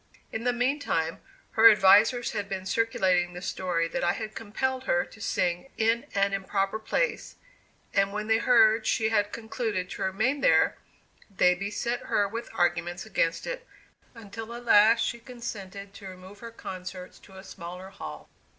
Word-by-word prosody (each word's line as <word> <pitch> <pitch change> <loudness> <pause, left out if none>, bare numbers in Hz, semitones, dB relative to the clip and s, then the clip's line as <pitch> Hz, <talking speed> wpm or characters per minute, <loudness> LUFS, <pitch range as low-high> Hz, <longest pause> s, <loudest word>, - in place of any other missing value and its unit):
In 225 +2 -4
the 245 - +3
mean 250 +4 0
time, 165 - -1 0.3
her 225 +1 +8
advisers 215 +4 +5
had 205 -2 -4
been 190 -1 -4
circulating 190 -5 +1
the 180 - -8
story 175 -4 -1
that - - -3
I 175 0 +2
had 215 -1 -6
compelled 260 +5 -3
her 260 0 +1
to 220 - -16
sing 175 +7 -1
in 225 +1 +1
an 200 0 +2
improper 195 +1 -1
place, - - -2 0.6
and 195 0 +2
when 210 +1 -3
they 220 +1 +2
heard 225 -2 +4
she 220 -1 +1
had 210 -2 +1
concluded 220 -5 -3
to - - -7
remain 220 +9 0
there, - - +4 0.5
they 180 -2 +3
beset 205 +6 -3
her 205 -1 +2
with 230 +3 -6
arguments 175 +1 0
against 170 -5 0
it, - - -6 0.5
until 225 +1 -8
at 240 0 -9
last 225 +1 +6
she 235 - -3
consented 200 -5 -8
to 200 - -10
remove 185 +2 -12
her 235 - -8
concerts 185 -4 -8
to 195 - -18
a 190 - -10
smaller 180 0 -9
hall. - - -9
205 Hz, 170 wpm, -27 LUFS, 190-230 Hz, 0.6 s, her